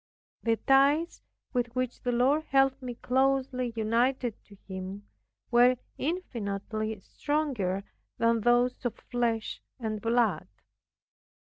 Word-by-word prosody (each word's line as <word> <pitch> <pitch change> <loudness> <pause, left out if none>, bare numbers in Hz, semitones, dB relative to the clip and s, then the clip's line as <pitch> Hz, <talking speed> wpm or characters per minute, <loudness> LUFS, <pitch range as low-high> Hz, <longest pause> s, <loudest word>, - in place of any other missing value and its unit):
The 225 -1 +1
ties, 280 - +3 0.3
with 240 -1 -1
which 255 -1 -2
the 245 - 0
Lord 270 +6 +2
held 270 0 +3
me 250 -2 -5
closely 260 0 +1
united 235 +2 +1
to 200 - -16
Himself, 190 +1 -6 0.5
were 245 +1 +6 0.2
infinitely 220 - -3
stronger 245 -10 -1 0.3
than 230 0 +2
those 240 +2 +2
of 245 - -1
flesh 235 -3 -2 0.2
and 215 -3 -3
blood. 230 -7 +1
245 Hz, 110 wpm, -29 LUFS, 220-265 Hz, 0.5 s, were